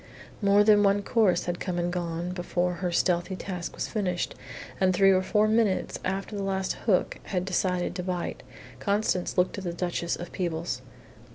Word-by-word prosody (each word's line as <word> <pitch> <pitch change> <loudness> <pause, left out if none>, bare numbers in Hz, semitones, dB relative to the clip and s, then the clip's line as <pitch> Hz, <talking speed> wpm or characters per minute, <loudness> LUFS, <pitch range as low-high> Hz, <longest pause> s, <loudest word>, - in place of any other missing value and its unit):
More 200 0 +5
than 210 -1 +6
one 200 0 +3
course 200 -6 +2
had 175 0 -2
come 180 -2 -3
and 175 0 -1
gone 175 0 -3
before 180 0 -1
her 180 -2 0
stealthy 175 +1 +1
task 180 -2 -5
was - - -3
finished, 185 -5 -1 0.5
and 185 -1 +3
three 195 +1 +6
or 185 -1 +4
four 210 +3 +2
minutes 215 -3 +1
after 195 +3 -3
the 200 - -3
last 190 -1 -1
hook 190 -5 +2
had 180 -2 -2
decided 180 -1 0
to 180 - -3
bite, 180 -1 -3 0.4
Constance 200 -3 0
looked 180 +2 +2
at - - -8
the 175 -2 -3
Duchess 170 -1 -2
of 175 0 -8
Peebles. 170 -2 -2
185 Hz, 180 wpm, -27 LUFS, 175-200 Hz, 0.5 s, than